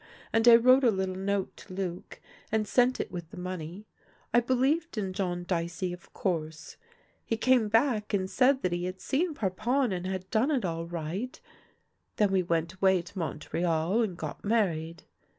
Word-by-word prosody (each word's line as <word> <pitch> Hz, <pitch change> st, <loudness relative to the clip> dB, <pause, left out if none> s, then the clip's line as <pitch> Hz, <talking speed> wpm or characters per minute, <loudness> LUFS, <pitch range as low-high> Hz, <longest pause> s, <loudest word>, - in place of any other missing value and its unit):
And 225 Hz, +1 st, +3 dB
I 235 Hz, -, +11 dB
wrote 255 Hz, +3 st, +6 dB
a 245 Hz, -, +6 dB
little 190 Hz, -3 st, -1 dB
note 195 Hz, +1 st, -2 dB
to -, -, -12 dB
Luc, 185 Hz, -2 st, -5 dB, 0.3 s
and 215 Hz, -1 st, +1 dB
sent 250 Hz, +3 st, +3 dB
it -, -, -3 dB
with 175 Hz, -3 st, -6 dB
the -, -, -12 dB
money. 180 Hz, +2 st, -6 dB, 0.5 s
I 240 Hz, -, +7 dB
be 245 Hz, +2 st, 0 dB
lieved 295 Hz, +3 st, +1 dB
in 195 Hz, -3 st, -2 dB
John 180 Hz, -2 st, -2 dB
Dicey, 175 Hz, 0 st, -2 dB
of 180 Hz, -, -12 dB
course. 160 Hz, -4 st, -3 dB, 0.5 s
He 225 Hz, -, -2 dB
came 250 Hz, -1 st, +3 dB
back, 225 Hz, -1 st, +2 dB
and 190 Hz, -3 st, 0 dB
said 265 Hz, +6 st, +3 dB
that 185 Hz, -, +1 dB
he 175 Hz, 0 st, -1 dB
had 185 Hz, +1 st, -5 dB
seen 315 Hz, +3 st, -1 dB
Parpon 230 Hz, +5 st, 0 dB
and 180 Hz, 0 st, -3 dB
had 190 Hz, -1 st, -4 dB
done 225 Hz, +6 st, +2 dB
it 265 Hz, -9 st, +1 dB
all 165 Hz, -1 st, -3 dB
right; 175 Hz, -, -4 dB, 0.8 s
then 205 Hz, -2 st, +2 dB
we 190 Hz, -1 st, +3 dB
went 170 Hz, 0 st, -1 dB
away 190 Hz, -1 st, +2 dB
to 185 Hz, -, -9 dB
Montreal 165 Hz, +4 st, 0 dB
and 195 Hz, -6 st, -2 dB
got 155 Hz, -2 st, -6 dB
married. 170 Hz, -7 st, 0 dB
190 Hz, 185 wpm, -29 LUFS, 175-230 Hz, 0.8 s, I